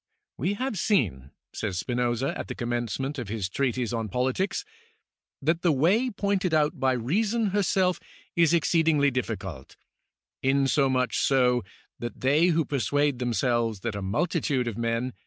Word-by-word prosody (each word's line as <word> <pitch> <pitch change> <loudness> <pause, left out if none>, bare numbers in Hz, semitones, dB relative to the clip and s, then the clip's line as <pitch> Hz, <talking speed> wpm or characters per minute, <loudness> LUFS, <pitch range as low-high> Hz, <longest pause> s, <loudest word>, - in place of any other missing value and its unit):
" - - -60
We 180 +10 0
have 250 -3 -2
seen," 95 - +1 0.2
says 100 -5 -3
Spinoza, 120 +4 -1
at - - -5
the - - -5
commencement 120 +4 -2
of 120 - -5
his 105 -2 -2
Treatise 125 +2 -1
on 115 -2 -2
Politics,^ 130 - -1 0.4
" - - -67
that 165 +2 +2
the 175 - +3
way 185 - +3
pointed 200 -5 0
out 150 -2 +1
by 130 0 +2
Reason 205 - 0
herself 190 -2 +1 0.4
is 170 -2 +4
exceeding 160 -2 +3
difficult, 95 - -5 0.6
insomuch 135 -1 +2
so 125 -2 +3 0.4
that 120 0 -6
they 145 +6 +4
who 165 -3 +2
persuade 145 +1 0
themselves 120 -3 0
that 115 -2 -2
a 100 - -4
multitude 135 - 0
of 115 - -3
men 115 +2 -1
130 Hz, 150 wpm, -26 LUFS, 120-165 Hz, 0.6 s, is